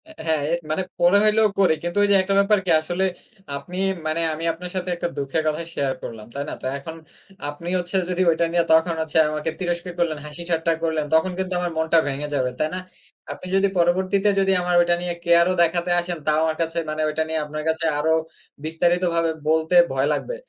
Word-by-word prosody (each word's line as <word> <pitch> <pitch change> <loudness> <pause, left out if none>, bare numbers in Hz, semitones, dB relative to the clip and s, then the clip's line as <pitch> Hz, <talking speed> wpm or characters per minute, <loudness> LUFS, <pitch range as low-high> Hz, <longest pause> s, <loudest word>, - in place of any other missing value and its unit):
এ্যা - - -9
হ্যাঁ, 160 -2 +2 0.3
মানে 155 +5 0 0.2
ফোনে 175 +3 +4
হইলেও 215 0 +4
করে। 190 -4 +4
কিন্তু 175 +2 -3
ঐযে, 200 0 +4
একটা 190 +1 -1
ব্যাপার 200 +1 +3
কি 180 - +1
আসলে 175 +4 -2 0.5
আপনি 180 +5 -9 0.3
মানে 155 +2 0
আমি 155 +2 -6
আপনার 180 +2 -7
সাথে 185 0 -2
একটা 175 - -3
দুঃখের 140 +3 -1
কথা 155 +1 -1
শেয়ার 135 -1 -1
করলাম, 110 -2 -8
তাই 140 - -2
না? - - -4
তা - - -3
এখন 160 +4 -8 0.5
আপনি 145 +4 -9
হচ্ছে 180 +2 -3
যদি 180 0 -1
ওইটা 165 +1 +2
নিয়ে 170 0 +2
তখন 165 +1 +3
হচ্ছে 160 0 0
আমাকে 155 +1 -3
তিরস্কার 175 0 -3
করলেন, 165 -3 0
হাসিঠাট্টা 165 +1 -1
করলেন। 160 -2 0
তখন 160 +4 +3
কিন্তু 190 0 -2
আমার 175 -1 -2
মনটা 160 +1 +2
ভেঙে 140 +1 -3
যাবে, 130 -2 +1
তাই 155 - +1
না? - - -1 0.5
আপনি 185 - -8
যদি 195 +1 +3
পরবর্তীতে 185 +4 +2
যদি 195 0 +2
আমার 180 0 0
ওইটা 175 0 +2
নিয়ে 175 0 -2
কেয়ার 170 0 +5
ও - - +1
দেখাতে 170 +1 +2
আসেন। 175 0 -1
তাও 155 0 +4
আমার 160 -1 0
কাছে 165 +1 -1
মানে 155 0 -2
ওইটা 160 +1 -1
নিয়ে, 160 0 -1
আপনার 155 +1 -6
কাছে 160 +1 0
আরও 160 +2 +2 0.5
বিস্তারিতভাবে 170 +1 +1 0.2
বলতে 160 +2 +1 0.2
ভয় 135 +1 +1
লাগবে। - - -3
170 Hz, 205 wpm, -22 LUFS, 155-180 Hz, 0.5 s, কেয়ার